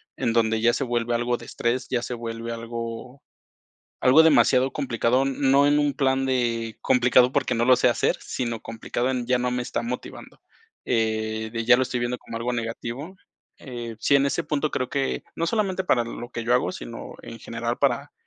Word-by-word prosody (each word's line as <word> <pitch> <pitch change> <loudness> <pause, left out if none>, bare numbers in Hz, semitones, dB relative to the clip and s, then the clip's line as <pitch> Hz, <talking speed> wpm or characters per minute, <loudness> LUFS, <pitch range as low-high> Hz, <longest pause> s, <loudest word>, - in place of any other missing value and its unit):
en 120 -4 -1
donde 110 -1 +2
ya 120 0 +4
se - - -1
vuelve 120 -1 -1
algo 120 +1 0
de - - -12
estrés, 125 +2 -2
ya 125 -2 0
se 125 - -4
vuelve 115 0 -5
algo 115 +3 -6 0.8
algo 130 +5 +6
demasiado 135 -4 +4
complicado, 130 -2 +1
no 135 +1 +3
en 145 0 +4
un 145 -1 +2
plan 135 0 +1
de 115 -3 -1
complicado 125 0 +4
porque - - 0
no 115 0 +1
lo 130 +1 +6
sé - - +3
hacer, - - +1
sino 115 -3 -4
complicado 115 +3 -3
en 125 -2 -2
ya 125 0 +2
no 125 0 -1
me 125 0 -1
está 120 - -3
motivando, 125 +2 -7 0.4
eh, 110 -1 -1
de 115 -1 -3
ya 125 +2 +6
lo 130 - +1
estoy 125 -1 -2
viendo 120 +1 -2
como 115 - -8
algo 120 +2 -2
negativo, 120 +8 -5 0.4
eh, 120 -4 -7
sí, 140 - +2
en 140 0 +3
ese 155 +4 -1
punto 150 0 -1
creo 130 -1 -2
que 135 -1 -1
no 165 - -1
solamente 190 -1 0
para 120 -9 +2
lo 120 +1 -7
que 115 -2 -5
yo 120 - +1
hago, 125 - +2
sino - - -8
en 115 - -9
general 115 +1 -4
para 140 +1 0
125 Hz, 200 wpm, -24 LUFS, 115-135 Hz, 0.8 s, algo